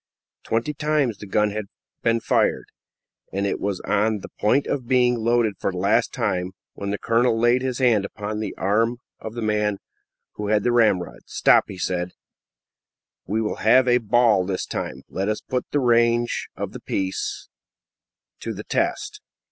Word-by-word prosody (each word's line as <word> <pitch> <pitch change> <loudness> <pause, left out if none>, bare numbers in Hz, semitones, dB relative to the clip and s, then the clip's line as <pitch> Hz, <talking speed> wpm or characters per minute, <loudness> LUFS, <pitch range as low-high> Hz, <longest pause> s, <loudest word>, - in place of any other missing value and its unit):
Twenty 115 +7 -1
times 150 -6 0
had - - -31
the 105 - -9
gun 105 0 +2 0.5
been 115 0 +1
fired, - - +1 0.7
and 100 +1 -1
it 100 - -1
was 100 -2 -2
on 105 0 +1
the - - -9
point 125 +7 +3
of 130 -4 -3
being 125 -1 +4
loaded 115 -2 +1
for - - -1
the 90 - -6
last 105 +6 +2
time, 95 -6 -1 0.2
when 100 - -5
the 105 - -1
colonel 115 +1 +2
laid 120 +2 +3
his 130 -2 -2
hand 120 -6 +3
upon 105 +1 -5
the 110 -3 -4
arm 115 +5 +1 0.2
of 110 +1 -7
the 120 - -3
man 105 -1 +1 0.6
who 105 - -3
had 105 -1 +2
the 120 - +2
ramrod. 95 - +2
"Stop!" - - +4
he 95 - -8
said; 90 0 -2 1.1
"we 110 +4 0
will 105 - -2
have 125 +4 +4
a 125 0 +4
ball 115 -3 +3
this 95 0 -2
time. 65 +1 -5
Let 95 +2 -2
us 105 - -1
put 125 -1 -3
the 145 - +1
range 120 -1 +2
of - - -4
the - - -9
piece 95 -1 -3 0.9
to - - -4
the - - -7
test." - - -2
110 Hz, 175 wpm, -23 LUFS, 100-120 Hz, 1.1 s, being